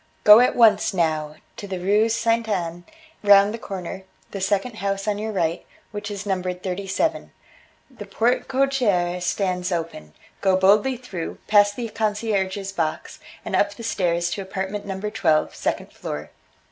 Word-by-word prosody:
Go 210 +1 +9
at 250 - +3
once, 225 -4 +4
now, 155 -3 0 0.2
to 200 - -7
the 190 -2 -4
Rue 205 +5 +2
Ste. 230 0 +1
Anne, 175 -3 -3 0.4
round 200 0 +6
the 230 - -6
corner, 190 -2 -6 0.3
the 195 - -5
second 205 +4 -1
house 195 0 -2
on 205 -1 0
your 220 +1 -3
right, 170 -4 -1 0.3
which 205 0 -5
is 205 0 -6
numbered 185 -2 -3
thirty 195 +1 -4
seven. 320 +11 -1 0.6
The 210 -5 -10
porte 230 +5 0
cochere 240 -10 +1
stands 180 0 -1
open, 160 - -5 0.3
go 190 -1 +3
boldly 205 +7 +3
through, 195 -9 -6
past 205 -1 +4
the 240 -2 -4
concierge's 205 -3 -2
box, 165 -4 -3 0.3
and - - -2
up 205 0 +1
the 230 - -10
stairs 175 -5 0
to 200 - -3
apartment 190 +2 -5
number 195 +2 -4
twelve, 155 -5 +1
second - - -3
floor. 75 0 -6
200 Hz, 160 wpm, -23 LUFS, 180-215 Hz, 0.6 s, Go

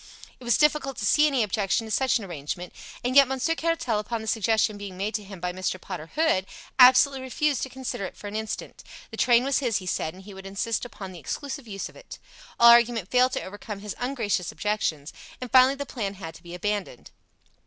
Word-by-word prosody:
It - - -14
was 240 -1 +3
difficult 300 -3 +2
to 210 - -3
see 300 +7 +5
any 270 -5 +2
objection 205 +1 0
to 220 - -8
such 260 +3 +2
an 220 - -7
arrangement, 175 +1 -6 0.3
and 250 +1 -1
yet 280 -1 +8
Monsieur 265 +5 0
Caratal, 325 -10 -1
upon 225 +2 -4
the - - -8
suggestion 220 0 +1
being 200 -2 -8
made 205 +3 -2
to 210 - -2
him 195 -2 -10
by 180 0 -3
Mr. 185 0 -3
Potter 175 -4 -7
Hood, 300 -12 +2 0.3
absolutely 260 +2 +7
refused 270 +1 0
to 265 - -3
consider 255 -6 -5
it - - -9
for - - -12
an 205 +1 -6
instant. 220 0 -5 0.3
The - - -8
train 240 -1 +4
was 275 0 +1
his, 240 -6 0
he 185 - -6
said, 160 -2 -2
and 190 - -13
he 205 +1 -11
would 190 0 -10
insist 225 +5 -2
upon 195 -5 -8
the 180 - -10
exclusive 275 - -5
use 195 -2 -5
of - - -16
it. - - -11 0.4
All 235 0 +9
argument 235 -4 +4
failed 255 +1 +4
to - - -2
overcome 205 +2 -7
his 210 -1 -6
ungracious 230 -8 -1
objections, 165 -8 -2 0.3
and 250 -3 -7
finally 260 +2 +6
the 285 0 -5
plan 205 -7 -4
had 165 -4 -8
to - - -15
be 175 0 -9
abandoned. 200 -7 -4
220 Hz, 225 wpm, -26 LUFS, 195-255 Hz, 0.4 s, All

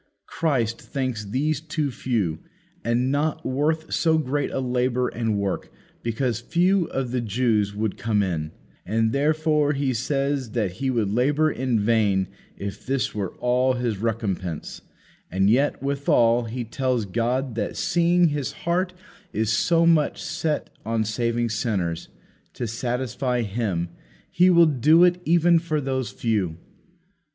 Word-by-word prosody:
Christ 120 -8 -1
thinks 130 -6 -3
these 140 +8 -1
too 155 -2 -2
few, 105 -11 -1 0.4
and 120 +3 +1
not 150 +2 -1
worth 155 +4 0
so 160 -1 +3
great 145 -1 -1
a - - -3
labour 125 -1 0
and 110 -2 -1
work, 100 -1 -2 0.3
because 115 0 -1
few 175 +8 +2
of 130 -3 -3
the 125 -1 0
Jews 110 -2 +1
would 105 -1 -2
come 105 -1 +1
in; 80 -5 -2 0.3
and 110 +2 +1
therefore 150 +1 +2
He 135 -2 0
says 135 0 -1
that 105 -6 0
He 130 +9 -3
would 115 -6 0
labour 145 +6 +2
in 125 -3 0
vain 100 -3 +2 0.3
if 100 -1 -6
this 135 0 -1
were 100 -3 -4
all 125 +1 +2
His 120 -5 -2
recompense; 100 -7 -3 0.5
and 95 +3 +2
yet 135 +3 +1
withal 125 -4 +2
He 120 +2 -4
tells 125 -1 -1
God 120 +5 -1
that 115 - -3
seeing 175 -1 +3
His 145 -3 -3
heart 180 +2 -1 0.4
is 110 0 0
so 165 +7 +3
much 165 -3 +3
set 160 -2 -2
on 110 +1 0
saving 115 +2 0
sinners, 100 -7 -2 0.5
to 120 - -4
satisfy 125 +2 -2
Him, 100 -5 -2 0.4
He 180 +2 +5
will 170 -2 +7
do 155 +3 +5
it 180 0 +3
even 170 +1 +4
for 160 -2 -1
those 130 -4 -2
few. 100 -6 -1
125 Hz, 145 wpm, -24 LUFS, 110-145 Hz, 0.5 s, will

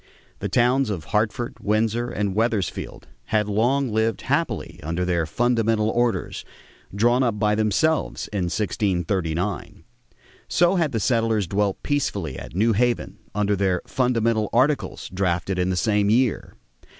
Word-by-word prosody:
The - - -3
towns 125 +1 +2
of 95 -7 -3
Hartford, 110 +5 -1
Windsor, 110 +3 0
and 100 -4 -2
Wethersfield 110 -2 -2 0.2
had 105 -1 +1
long 120 +5 +1
lived 110 -1 0
happily - - -2
under 85 +4 -2
their 85 -3 0
"Fundamental 115 +1 +1
Orders" 120 -1 -1 0.5
drawn 120 +5 +2
up 115 -5 +1
by 105 0 +2
themselves 110 +9 +1
in 100 -4 -1
1639; 90 -1 -2 0.6
so 175 +1 +3
had 160 -4 +1
the 115 - -1
settlers 115 -1 +1
dwelt 100 +2 -1
peacefully 100 - -1
at - - -10
New 110 +4 +3
Haven 120 +3 0 0.2
under 105 0 +1
their 95 -2 +1
"Fundamental 115 -4 +1
Articles" 135 +5 +1
drafted 90 0 -1
in 90 +1 +1
the 95 - 0
same 105 +2 +2
year. 120 +1 +1
110 Hz, 140 wpm, -23 LUFS, 95-120 Hz, 0.6 s, so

